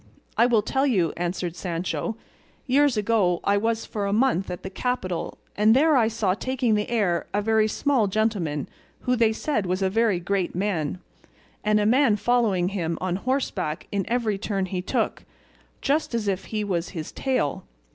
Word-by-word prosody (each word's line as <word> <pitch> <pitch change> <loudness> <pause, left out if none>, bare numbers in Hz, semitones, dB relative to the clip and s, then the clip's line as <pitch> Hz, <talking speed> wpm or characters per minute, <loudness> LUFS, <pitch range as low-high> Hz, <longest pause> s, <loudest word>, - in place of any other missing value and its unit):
"I 235 - +5
will 225 -4 +3
tell 270 +5 +1
you," 185 - +2
answered 175 0 -3
Sancho. 180 +6 -3 0.5
"Years 275 -1 +3
ago 205 -5 +2
I 200 - +3
was 225 +2 0
for 205 -2 -3
a - - -1
month 215 -4 +2
at 180 - -6
the 190 - -6
capital 190 -6 -2 0.2
and 215 +2 +5
there 305 +3 +5
I 235 -4 +4
saw 215 -4 0
taking 250 +2 0
the 210 0 0
air 200 -8 +1
a 205 - +2
very 220 0 +3
small 250 -1 +1
gentleman 190 -8 -1 0.3
who 250 - +1
they 230 -2 +3
said 220 -3 -1
was 185 +2 0
a 190 - +1
very 220 -3 +2
great 185 0 -1
man, 180 -5 -1 0.7
and 210 0 +3
a 205 - +1
man 245 0 +4
following 210 -6 +2
him 170 -4 -2
on 185 -1 -1
horseback 195 - -2
in 200 -3 -1
every 225 -4 0
turn 195 -2 -1
he 185 -1 -3
took, - - -1 0.6
just 285 -3 +1
as 220 -3 -1
if 195 -1 -1
he 215 -1 -2
was 180 -4 -2
his 155 - -5
tail. 255 - -1
210 Hz, 180 wpm, -25 LUFS, 185-235 Hz, 0.7 s, I